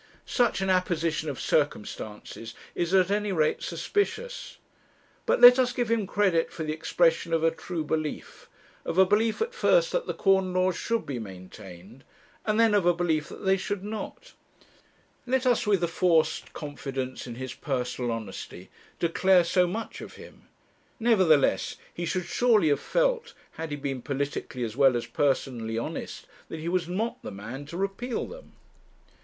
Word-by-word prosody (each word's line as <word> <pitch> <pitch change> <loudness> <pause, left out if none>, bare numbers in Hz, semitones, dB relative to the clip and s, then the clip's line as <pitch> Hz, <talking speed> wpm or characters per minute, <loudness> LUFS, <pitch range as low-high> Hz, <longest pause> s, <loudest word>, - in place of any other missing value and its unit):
Such 240 -5 +1
an 190 - 0
apposition 165 -4 0
of 140 - -5
circumstances 110 -4 -2 0.2
is 175 0 -1
at 190 0 +4
any 205 0 0
rate 155 -4 +1
suspicious. 445 +4 -2 0.7
But - - +3
let 245 +1 +10
us 250 -1 +2
give 240 -3 -1
him 220 -4 +1
credit 190 -5 +1
for 165 - -5
the 155 0 -2
expression 165 +1 +1
of 165 -1 +2
a 165 - +4
true 165 0 -4
belief; 155 0 -4 0.3
of - - -4
a 190 - +7
belief 215 - +2
at 475 +2 -6
first - - +3
that - - -1
the - - -3
corn 190 -2 +2
laws 185 0 +2
should 230 -1 -1
be 130 -4 -4
maintained, 95 +3 -11 0.4
and 215 +1 +2
then 225 -2 +5
of 200 -4 +3
a 175 - +4
belief 160 -3 0
that - - -9
they 190 0 +4
should 195 +1 -3
not; 220 - -7 0.9
let 260 +1 +1
us, 245 -4 +2
with 195 -4 +3
a - - +3
forced 165 -1 +1
confidence 135 -3 -5
in 120 - -6
his 130 0 -6
personal 125 -3 -2
honesty, 100 -4 -7 0.3
declare 180 +2 +4
so 180 +1 +2
much 220 +6 -5
of - - -9
him; - - -14 0.5
nevertheless, 190 - +3 0.2
he 175 0 -4
should 180 +1 -1
surely 215 -3 +3
have 145 -1 +2
felt, - - 0 0.2
had 165 0 -6
he 145 - -3
been 135 -2 -4
politically 140 -1 -3
as 110 -2 -4
well 135 -2 +5
as 120 - -4
personally 125 -5 -1
honest, 115 - -5 0.2
that - - -5
he 160 - -5
was 180 -1 0
not 220 +6 -2
the - - -6
man 115 +8 -8
to 170 - -7
repeal 200 +6 -2
them. - - -12
170 Hz, 170 wpm, -27 LUFS, 140-210 Hz, 0.9 s, let